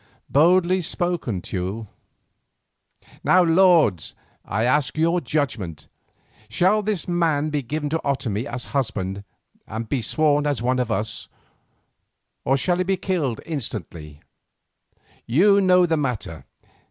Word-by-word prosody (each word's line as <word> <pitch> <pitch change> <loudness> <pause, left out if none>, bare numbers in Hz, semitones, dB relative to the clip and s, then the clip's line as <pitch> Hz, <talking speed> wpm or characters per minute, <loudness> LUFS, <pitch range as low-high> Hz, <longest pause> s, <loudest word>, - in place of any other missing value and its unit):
"Boldly 180 +4 +4
spoken, 170 - -2
Teule. 95 +4 -4 1.4
Now, 185 0 +5
lords, 165 - +3 0.3
I 110 +3 -2
ask 135 +4 +1
your 170 +2 +2
judgment. 115 - -3 0.6
Shall 185 - +2
this 210 -3 -2
man 160 -4 +1
be 150 -1 -1
given 150 +4 -3
to 160 - 0
Otomie 125 -5 -2
as 120 0 -5
husband 100 -7 -2 0.4
and 110 +1 -5
be 125 +3 -1
sworn 150 +3 +1
as 145 -4 0
one 125 +2 0
of 125 -2 -1
us, 105 +2 -3 1.2
or 135 - +2
shall 175 +6 +1
he 185 - +1
be 190 +1 0
killed 155 - -2
instantly? 85 - -6 1.1
You 200 - +4
know 180 -1 +5
the 165 -2 0
matter. 105 - -4
145 Hz, 125 wpm, -23 LUFS, 110-175 Hz, 1.4 s, Now